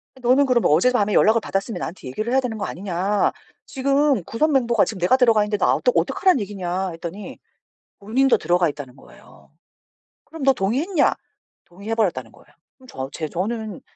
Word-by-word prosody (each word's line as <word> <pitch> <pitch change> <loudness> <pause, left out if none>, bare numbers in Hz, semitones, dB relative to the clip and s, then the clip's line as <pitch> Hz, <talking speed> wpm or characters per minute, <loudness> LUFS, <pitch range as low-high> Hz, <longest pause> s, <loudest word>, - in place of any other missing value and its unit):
아 - - -17
너는 255 +3 +3
그러면 250 -3 +2
어제 175 +12 +4
밤에 210 -4 0
연락을 225 +1 +4
받았으면 195 +2 -3
나한테 165 -5 -7
얘기를 215 - -4
해야 265 - +3
되는 245 -4 -4
거 205 - -3
아니냐 195 +2 -1 0.3
지금 275 -4 +1
구성 305 - 0
멤버가 240 -5 +2
지금 210 - -6
내가 180 +9 +3
들어가 230 -5 +4
있는데 210 0 -2
나 - - +2
어떡 - - +1
어떡하란 370 -8 +2
얘기냐 190 -2 -3
했더니 170 +4 -8 0.6
본인도 250 +6 +2
들어가 175 +1 +1
있다는 140 -3 -8
거예요. - - -19 0.8
그럼 320 -3 -9
너 270 0 +5
동의했냐? 270 - +1 0.5
동의해 200 +6 -6
버렸다는 165 - -1
거예요. - - -20 0.3
그럼 260 -1 -19
저 135 - -6
제 155 +2 -5
저는 210 +4 -4
215 Hz, 415 characters per minute, -21 LUFS, 180-255 Hz, 0.8 s, 너